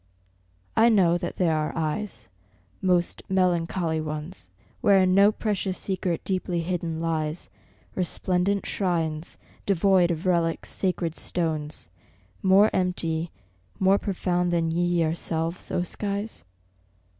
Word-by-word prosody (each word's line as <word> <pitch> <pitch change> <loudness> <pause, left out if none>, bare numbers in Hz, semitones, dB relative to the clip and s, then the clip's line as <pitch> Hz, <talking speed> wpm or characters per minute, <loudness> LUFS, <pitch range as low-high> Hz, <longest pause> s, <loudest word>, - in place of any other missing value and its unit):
I 225 +2 +6
know 185 -6 +4
that 175 - -4
there 165 -4 +2
are 155 0 -2
eyes, 165 - -3 0.5
most 180 -2 +1
melancholy 175 -3 +1
ones, 155 +4 -6 0.3
Wherein 190 -2 +5
no 200 +2 +6
precious 205 -3 -2
secret 185 -3 -2
deeply 185 -2 -1
hidden 165 -2 -2
lies, 160 -1 -2 0.4
Resplendent 185 +2 0
shrines, 165 -4 -1 0.3
devoid 190 -2 +4
of 170 0 -3
relics, 170 -2 +1
sacred 175 -3 -1
stones, 155 - -2 0.5
More 195 +3 +5
empty, 170 -3 0 0.5
more 195 +1 +4
profound 180 -2 0
than 165 -1 +1
ye 170 +2 +1
yourselves, 165 0 -1
O 175 - 0
skies? 200 - -4
175 Hz, 110 wpm, -26 LUFS, 165-190 Hz, 0.5 s, I